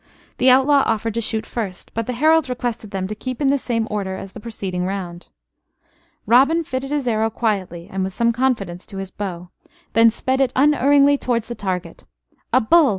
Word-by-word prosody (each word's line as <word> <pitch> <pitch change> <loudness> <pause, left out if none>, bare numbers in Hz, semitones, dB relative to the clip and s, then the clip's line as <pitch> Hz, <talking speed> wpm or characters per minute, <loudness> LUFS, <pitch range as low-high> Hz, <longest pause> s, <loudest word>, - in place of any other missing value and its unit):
The 255 - +5
outlaw 270 +2 +5
offered 225 0 -1
to 230 - -1
shoot 220 0 -1
first; 200 -6 -6
but 230 -1 -3
the 250 - -2
heralds 310 +3 +3
requested 240 -3 -3
them 190 -2 -3
to 210 - -4
keep 255 +4 -6
in 280 -2 +2
the 280 - +3
same 230 -3 -1
order 195 -3 -3
as 195 - -8
in - - -33
the - - -9
preceding 195 -5 -4
round. 180 -2 -5 1.0
Robin 275 +8 +4
fitted 270 -2 -4
his 290 -3 -1
arrow 220 -1 +1
quietly 195 -7 -2
and 190 0 -3
with 190 - -3
some 235 0 +2
confidence 225 -8 -1
to 195 - -9
his 195 -1 -6
bow, 180 -3 -6 0.4
then 230 0 +6
sped 260 +4 -1
it 255 -2 +1
unerringly 285 0 +4
towards 235 -2 -1
the - - -3
target. 185 -5 -5 0.5
"A - - +5
bull! 305 +6 +5
230 Hz, 200 wpm, -21 LUFS, 195-260 Hz, 1.0 s, then